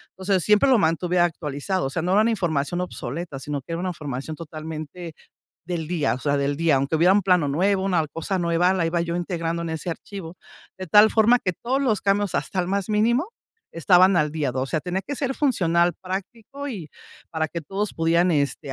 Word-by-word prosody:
O 190 - -11
sea, 195 -1 +3
siempre 210 +8 +3
lo 255 - +6
mantuve 175 0 +1
actualizado. 170 +1 -1
O - - -1
sea, 150 - -2
no 180 +2 +1
era 205 - +5
una 230 +2 +2
información 175 -5 -1
obsoleta 165 -3 -5
sino 145 +1 -4
que 165 - -7
era 165 - -3
una 185 +1 -2
información 150 -3 -5
totalmente 160 +1 -7 0.5
del 170 -2 -3
día. 165 -7 0
O - - -6
sea, 145 +2 0
del 140 0 0
día. 165 -1 +2
Aunque 140 +4 0
hubiera 175 +4 +5
un 205 - +3
plano 180 -4 +3
nuevo, 190 +6 +1
una 180 -5 +1
cosa 165 +6 -3
nueva, 170 +2 +2
la 175 -3 0
iba 170 +1 0
yo 170 0 -3
integrando 170 -1 -2
en 165 - -4
ese 160 +2 -5
archivo. 175 0 -8 0.4
De 185 - -6
tal 210 +6 +7
forma 230 +2 +5
que 185 - -2
todos 255 +9 -2
los 220 -7 +1
cambios 200 -1 0
hasta 190 - -2
el 175 - -2
más 200 +1 -1
mínimo 235 - +2 0.4
estaban 180 +2 +4
al 150 -2 +1
día, 150 -4 -1
de 125 - -5
o - - 0
sea, 155 +3 -1
tenía 185 +3 -3
que 285 - -3
ser 270 -1 -2
funcional, 175 - +2
práctico 220 +9 -6
y, 190 - -6 0.4
para 160 -1 -1
que 170 - -5
todos 195 +6 -3
pudieran 170 +2 +2
este, 145 -2 -1
175 Hz, 220 wpm, -23 LUFS, 160-195 Hz, 0.5 s, tal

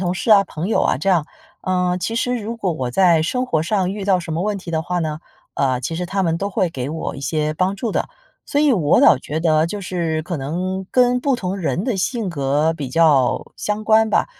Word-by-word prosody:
同 180 -1 0
事 215 +4 +2
啊、 200 -2 +7
朋 170 -2 -5
友 220 - +1
啊 - - +2
这 155 - -2
样。 175 -5 +3 0.4
呃， 180 -1 0
其 225 +6 -2
实 245 0 0
如 230 +2 -5
果 190 -6 -1
我 130 -5 -3
在 170 +2 +4
生 250 +9 -1
活 160 -10 0
上 190 0 0
遇 200 -1 -5
到 190 -2 +3
什 170 -2 -6
么 165 +3 -1
问 210 -1 -1
题 175 -3 -8
的 160 - 0
话 175 +1 -2
呢， 155 -2 -3 0.3
呃， 130 -2 0
其 165 - -4
实 180 +2 -3
他 195 +1 -1
们 165 0 +1
都 200 +3 -3
会 185 -2 +1
给 135 -3 -5
我 160 +1 -4
一 - - -8
些 155 +2 -1
帮 185 +4 0
助 220 +2 -3
的。 - - -1 0.4
所 290 - 0
以 295 -3 +4
我倒 155 - +5
觉 145 +4 -5
得 160 -1 +2
就 205 +2 -5
是 170 -4 -2
可 175 0 -4
能 180 +7 -3
跟 250 0 +3
不 270 -1 +1
同 190 -1 -3
人 180 +1 -2
的 245 -5 -1
性 220 +2 -1
格 150 0 +1
比 145 -5 -5
较 140 -3 +3
相 210 +1 -3
关 220 0 +4
吧， - - +2
180 Hz, 265 characters per minute, -20 LUFS, 160-205 Hz, 0.4 s, 啊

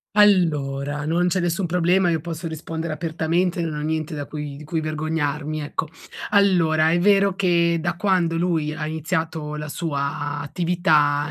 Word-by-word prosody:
Allora, 150 -8 +2
non 170 +3 +1
c'è 185 +1 +1
nessun 175 +1 0
problema, 180 +1 +2
io 160 -2 0
posso 170 0 -5
rispondere 160 0 -5
apertamente, 170 +2 -1
non 165 -2 -2
ho - - -4
niente 155 0 -2
da 145 - -4
cui 150 -1 -6
di 150 - -10
cui 160 +2 -2
vergognarmi, 155 -1 -2
ecco. 150 +1 -4 0.4
Allora, 170 -6 +4
è 170 - +3
vero 200 0 +4
che 170 -3 +2
da 175 +1 -2
quando 175 -4 +1
lui 165 -3 0
ha 155 -1 -4
iniziato 160 -1 -3
la 150 0 -5
sua 145 -2 -3
attività 150 -2 +1
160 Hz, 160 wpm, -22 LUFS, 150-175 Hz, 0.4 s, Allora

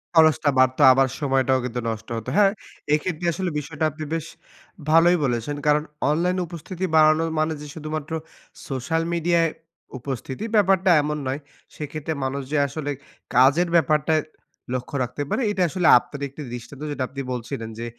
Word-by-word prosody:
খরচটা 155 -2 +5
বাড়তো 130 0 +3
আবার 135 +1 +3
সময়টাও 135 -2 +2
কিন্তু 125 0 -3
নষ্ট 110 0 -5
হতো। 115 - -5
হ্যাঁ 200 -2 +6 0.4
এক্ষেত্রে 160 +2 -1
আসলে 185 +2 -2
বিষয়টা 150 +1 -3
আপনি 155 +2 -7
বেশ 165 -1 -2 0.7
ভালোই 170 +2 +6
বলেছেন। 120 +3 -1
কারণ 150 0 +4 0.3
অনলাইনে 180 +4 +1
উপস্থিতি 175 +2 -7
বাড়ানোর 155 +1 +5
মানে 155 +1 +1
যে 150 - -8
শুধুমাত্র 155 -1 -5 0.6
সোশ্যাল 145 +5 -1
মিডিয়ায় 170 -1 +2 0.5
উপস্থিতি, 130 - -5
ব্যাপারটা 190 -2 +4
এমন 150 +1 -2
নয়। 135 +2 -2 0.4
সেক্ষেত্রে 155 +1 -4
মানুষ 135 +1 -2
যে 155 - +1
আসলে 145 +1 -4 0.4
কাজের 140 +8 +5
ব্যাপারটায় 155 -1 +3 0.5
লক্ষ্য 130 +2 -4
রাখতে 125 +4 -4
পারে - - 0
এটাই 185 -3 +1
আসলে 180 0 0
আপনার 140 +3 -10
একটি 140 +3 -10
দৃষ্টান্ত। 125 +3 -8
যেটা 140 -2 -2
আপনি 140 +1 -6
বলছিলেন 120 -1 -5
যে 115 - -4
150 Hz, 155 wpm, -23 LUFS, 135-165 Hz, 0.7 s, হ্যাঁ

